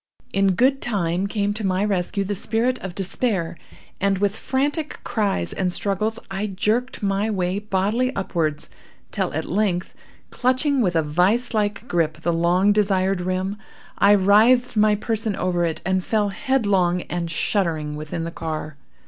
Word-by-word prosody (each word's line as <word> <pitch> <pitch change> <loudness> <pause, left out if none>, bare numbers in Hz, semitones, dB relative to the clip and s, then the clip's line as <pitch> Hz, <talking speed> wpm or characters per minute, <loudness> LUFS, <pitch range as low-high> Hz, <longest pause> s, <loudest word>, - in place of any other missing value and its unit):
In 195 -1 +3
good 270 +6 +3
time 185 -3 -1
came 205 0 -1
to 215 +1 -5
my 190 +1 +1
rescue 200 0 0
the 200 +1 -2
spirit 230 +5 0
of 185 -2 -7
despair, 190 -3 -1 0.4
and, 195 0 +1
with 205 +1 0
frantic 290 +6 -2
cries 200 - -1
and 185 -2 -1
struggles, 210 +4 -1
I 195 +2 -2
jerked 215 +6 -1
my 200 +2 +1
way 185 -2 -1
bodily 210 +5 0
upwards, 165 -6 -2 0.4
till - - -1
at 160 - -2
length, 190 -2 -1 0.4
clutching 260 +2 +1
with 180 -6 +1
a 160 - +3
vise 185 +12 +1
like 215 +2 -1
grip 160 -4 0
the 170 +1 0
long 175 +4 +3
desired 195 -2 +1
rim, 185 +2 -2 0.4
I 200 +1 +6
writhed 220 +6 +4
my 210 0 +4
person 220 0 -1
over 175 -2 0
it, 165 -1 -3
and 185 -1 +1
fell 210 0 +1
headlong 195 -6 +1
and 175 -1 -4
shuddering 160 -4 -1
within 155 +2 -5
the 165 - -4
car. 155 -2 -5
195 Hz, 155 wpm, -22 LUFS, 175-215 Hz, 0.4 s, I